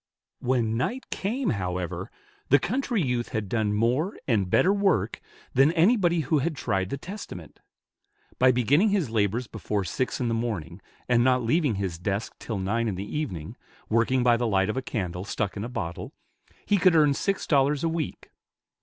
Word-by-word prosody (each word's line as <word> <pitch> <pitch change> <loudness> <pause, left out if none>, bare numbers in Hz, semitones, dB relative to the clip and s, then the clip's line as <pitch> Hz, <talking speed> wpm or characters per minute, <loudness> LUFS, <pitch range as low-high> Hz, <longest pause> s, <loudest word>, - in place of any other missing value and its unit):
When 120 -3 0
night 245 - -2
came, 230 +6 -1
however, 90 -4 -3 0.4
the 140 - +7
country 240 - -1
youth 125 -3 -1
had 105 -2 -3
done 105 0 0
more 125 - +1
and 105 -8 +1
better 185 - +4
work, 190 - +1 0.3
than 135 +4 +5
anybody 175 -1 +3
who 150 +1 +1
had 155 +3 -1
tried 95 -8 -1
the 140 - -3
Testament. 145 - -9 0.8
By 130 0 +6
beginning 140 - +3
his 185 - 0
labors 110 +2 +1
before 105 -2 -3
six 125 +9 -2
in 125 - 0
the 115 - 0
morning, 100 -7 -3 0.3
and 120 -1 +3
not 130 -1 +3
leaving 140 0 +2
his 95 -4 -3
desk 100 +4 -2
till 110 - -4
nine 110 +5 0
in 105 - -1
the 100 +7 -6
evening, 95 - -4 0.3
working 115 +3 +2
by 120 -1 +4
the 120 0 0
light 95 -1 +2
of - - -7
a 130 - -1
candle 90 -8 -4
stuck 105 0 -3
in 100 - -4
a 120 - -4
bottle, 85 -9 -5 0.5
he 205 - +2
could 180 -2 +5
earn 150 -3 +5
six 195 +7 -1
dollars 140 0 +2
a - - +2
week. 160 -2 -4
120 Hz, 180 wpm, -26 LUFS, 105-155 Hz, 0.8 s, the